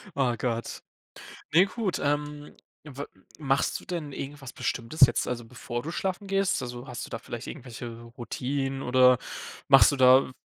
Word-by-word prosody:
Oh 130 -4 +1
Gott. 120 -2 -3 0.7
Ne, 180 +4 +7
gut, 215 -3 -2
ähm, 145 0 -2 0.3
w 140 -1 -7 0.4
machst 135 -2 +1
du - - -16
denn 165 -5 -4
irgendwas 140 -1 -7
Bestimmtes 120 +6 -4
jetzt, 120 - -1
also 120 -1 -3
bevor 120 0 -5
du 160 - -4
schlafen 190 +2 -3
gehst? 195 0 +1
Also, 120 +1 -7
hast 125 - -5
du - - -13
da 115 - -5
vielleicht 120 +1 -7
irgendwelche 120 -4 -8 0.2
Routinen 135 +2 -3
oder 125 0 +5 0.5
machst 135 +1 +8
du - - -1
da 130 0 +6
135 Hz, 160 wpm, -27 LUFS, 125-150 Hz, 0.7 s, machst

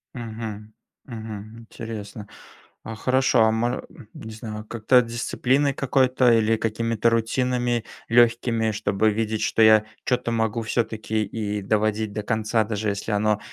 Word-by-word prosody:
Мгм, 110 -2 -7 0.3
мгм. 110 -2 -8
Интересно. 110 -2 -8 0.6
А 115 0 -7
хорошо, 130 +2 +2
а 110 - +4
мо 120 +3 -1 0.3
не 110 - -9
знаю, 110 -1 -7
как-то 120 +3 +3
дисциплиной 130 +4 0
какой-то 130 -2 +2
или 115 0 +3
какими-то 115 +1 0
рутинами 120 +1 0 0.3
легкими, 115 -1 +3
чтобы 105 0 +1
видеть 110 0 -2
что 115 - +1
я 110 -1 +6 0.2
чё-то 125 -2 -1
могу 115 0 0
всё-таки 110 -1 -1
и 105 0 -3
доводить 110 +1 0
до 105 -1 -4
конца. 110 +1 0
Даже 105 0 -2
если 100 +2 -3
оно 105 0 +1
110 Hz, 135 wpm, -24 LUFS, 110-115 Hz, 0.6 s, я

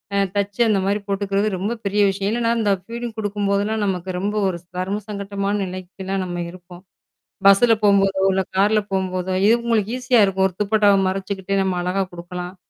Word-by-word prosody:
அ - - +2 0.2
தச்சு 200 +2 -1
அந்த 205 -3 +2
மாதிரி 200 +2 +1
போட்டுக்கிறது 200 +1 0
ரொம்ப 205 +6 -2
பெரிய 205 +1 +1
விஷயம். 195 +1 -2
ஏன்னன்னா 230 0 0
இந்த 210 -2 +2
அ - - -11
ஃபீடிங் 235 0 -6
குடுக்கும்போதெல்லாம் 205 +1 -1
நமக்கு 185 -1 -2
ரொம்ப 205 +3 -2
ஒரு 185 -2 -2 0.2
தர்ம 195 +3 -2
சங்கட்டமான 200 0 -3
நிலைக்குலாம் 185 +1 -5
நம்ம 175 -1 -4
இருப்போம். 180 0 -13 0.7
பஸ்ல 210 +4 +6
போம்போதோ 195 -1 +3
இல்ல 190 0 +1
கார்ல 210 +2 +3
போம்போதோ, 185 -1 -1
இவ் - - +5
இது 235 +2 +4
உங்களுக்கு 225 -1 0
ஈஸியா 250 -2 +3
இருக்கும். 190 0 +2
ஒரு 180 - -14
துப்பட்டாவ 205 -1 +4
மறச்சுக்கிட்டு 195 0 -2
நம்ம 185 -2 -1
அழகா 185 +2 0
குடுக்கலாம். 175 +1 -7
195 Hz, 175 wpm, -21 LUFS, 190-210 Hz, 0.7 s, பஸ்ல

